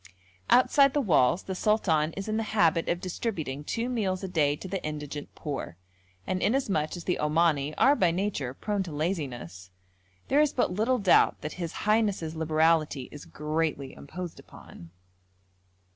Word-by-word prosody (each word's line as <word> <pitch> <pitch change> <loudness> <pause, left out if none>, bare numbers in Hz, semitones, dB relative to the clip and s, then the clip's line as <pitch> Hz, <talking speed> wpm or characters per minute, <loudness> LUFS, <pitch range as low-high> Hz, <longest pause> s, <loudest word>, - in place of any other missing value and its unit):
Outside 275 +2 +5
the - - +3
walls 170 - +3
the 190 - -4
sultan 180 -6 +1
is 195 +1 -6
in 215 0 -1
the - - 0 0.2
habit 165 -3 +3
of 175 - 0
distributing 170 - -4
two 230 +10 -2
meals 200 -7 -1
a - - -2
day 150 -5 +1
to 190 - -9
the 190 0 -4
indigent 150 -1 -6
poor; 140 - -5 0.5
and 185 0 -2
inasmuch 200 - 0
as 170 - -8
the 180 - -1
Omani 150 -1 +1
are 280 +2 +5
by 185 -10 +3
nature 165 -8 -2
prone 205 +4 -2
to 180 -4 -5
laziness, 130 - -4 0.6
there 285 +2 +4
is 300 -2 +2
but 245 - +1
little 225 +6 +1
doubt 200 -5 +3
that 150 - -5
his 165 -1 -3
highness's 205 -7 +1
liberality 155 -3 +1
is 145 - -10
greatly 150 -3 -2
imposed 175 +3 -8
on. 85 - -13
165 Hz, 160 wpm, -28 LUFS, 150-205 Hz, 0.6 s, Outside